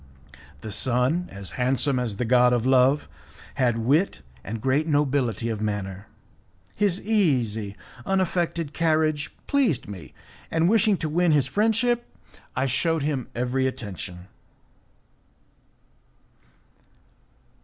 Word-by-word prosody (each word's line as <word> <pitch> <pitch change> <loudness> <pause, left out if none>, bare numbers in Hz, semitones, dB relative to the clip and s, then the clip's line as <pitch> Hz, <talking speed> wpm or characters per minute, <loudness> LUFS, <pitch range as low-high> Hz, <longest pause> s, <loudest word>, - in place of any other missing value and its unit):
The 110 - -6
son, 130 - +1
as 100 -1 -6
handsome 130 +1 +1
as 115 -5 -3
the 125 - -1
god 125 +1 +4
of 120 -1 0
love, 130 +2 +4 0.5
had 125 -4 +1
wit 140 - +1 0.2
and 110 +9 -5
great 135 +7 +1
nobility 135 - +1
of 110 -2 -3
manner. 100 -2 -4 0.7
His 200 -3 +1
easy, 125 - +1 0.3
unaffected 175 -4 -1
carriage 155 -2 +1
pleased 240 - +1
me, 90 -9 -10 0.3
and 165 +1 +2
wishing 210 -1 +3
to 160 - -3
win 170 +1 +2
his 145 -4 +3
friendship 225 - +1 0.5
I 130 - +1
shewed 160 +4 0
him 140 -5 -2
every 125 +2 0
attention. 95 -8 -7
135 Hz, 110 wpm, -25 LUFS, 115-165 Hz, 0.7 s, god